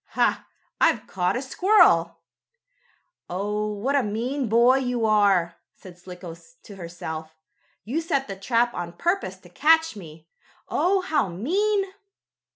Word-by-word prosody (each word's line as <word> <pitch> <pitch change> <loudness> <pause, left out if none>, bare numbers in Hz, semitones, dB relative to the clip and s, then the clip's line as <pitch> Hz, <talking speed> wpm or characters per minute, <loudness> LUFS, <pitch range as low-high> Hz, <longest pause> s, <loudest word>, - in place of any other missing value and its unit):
Ha! - - +1 0.3
I've - - +3
caught 180 0 -1
a 250 - -3
squirrel." 265 - +3 1.1
"Oh, 210 +3 -2
what 210 +7 -2
a 280 - +4
mean 240 +4 -2
boy 240 +4 +5
you 245 -3 -1
are!" 200 -6 +2 0.2
said 185 -2 -13
Slicko 180 -1 -10 0.3
to 205 - -12
herself. 160 -3 -7 0.5
"You 275 +10 -2
set 275 -4 -1
the 195 - -6
trap 235 +4 0
on 170 -1 -5
purpose 345 - -2
to - - -18
catch 320 -2 +3
me! 160 -4 -12 0.4
Oh, 385 +2 +1
how 320 - 0
mean!" 385 - 0
215 Hz, 135 wpm, -24 LUFS, 180-280 Hz, 1.1 s, boy